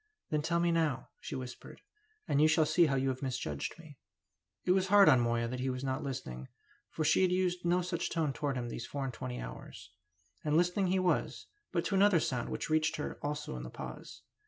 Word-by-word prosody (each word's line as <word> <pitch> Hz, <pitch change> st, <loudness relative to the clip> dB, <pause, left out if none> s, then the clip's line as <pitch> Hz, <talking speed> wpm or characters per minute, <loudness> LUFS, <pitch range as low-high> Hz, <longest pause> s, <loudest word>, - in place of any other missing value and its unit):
"Then 150 Hz, -1 st, +1 dB
tell 170 Hz, +2 st, 0 dB
me 170 Hz, 0 st, +2 dB
now," 155 Hz, -6 st, 0 dB
she -, -, -6 dB
whispered. 125 Hz, -2 st, -8 dB, 0.5 s
"And 140 Hz, -, +2 dB
you 155 Hz, -, +7 dB
shall 155 Hz, 0 st, +4 dB
see 170 Hz, +2 st, +4 dB
how 135 Hz, -, +1 dB
you 135 Hz, 0 st, +1 dB
have 130 Hz, 0 st, -3 dB
misjudged 125 Hz, -, -3 dB
me." 155 Hz, -5 st, -14 dB, 0.7 s
It 180 Hz, -, +3 dB
was 190 Hz, 0 st, +3 dB
hard 200 Hz, 0 st, +7 dB
on 130 Hz, -5 st, +7 dB
Moya 120 Hz, 0 st, +1 dB
that 125 Hz, +2 st, -4 dB
he 130 Hz, +1 st, -1 dB
was 125 Hz, 0 st, -3 dB
not 130 Hz, 0 st, -1 dB
listening, 125 Hz, -, -5 dB, 0.4 s
for 155 Hz, -, -2 dB
she 155 Hz, -, +4 dB
had 185 Hz, -1 st, +3 dB
used 180 Hz, -1 st, 0 dB
no 175 Hz, +1 st, +2 dB
such 170 Hz, -1 st, -2 dB
tone 160 Hz, -4 st, 0 dB
towards 140 Hz, -2 st, -2 dB
him 120 Hz, -1 st, -3 dB
these 120 Hz, +1 st, -5 dB
four 140 Hz, +1 st, -4 dB
and 130 Hz, -, -4 dB
twenty 60 Hz, -, -5 dB
hours. -, -, -9 dB, 0.5 s
And 150 Hz, 0 st, +2 dB
listening 180 Hz, +3 st, +2 dB
he 185 Hz, +1 st, +2 dB
was, 185 Hz, -1 st, 0 dB, 0.3 s
but 170 Hz, -3 st, 0 dB
to -, -, -2 dB
another 195 Hz, -2 st, +5 dB
sound 125 Hz, -5 st, -2 dB
which -, -, -3 dB
reached 155 Hz, 0 st, +2 dB
her 150 Hz, -, -5 dB
also 145 Hz, -, -3 dB
in 60 Hz, -, -5 dB
the -, -, -7 dB
pause. -, -, -9 dB
150 Hz, 225 wpm, -32 LUFS, 125-175 Hz, 0.7 s, you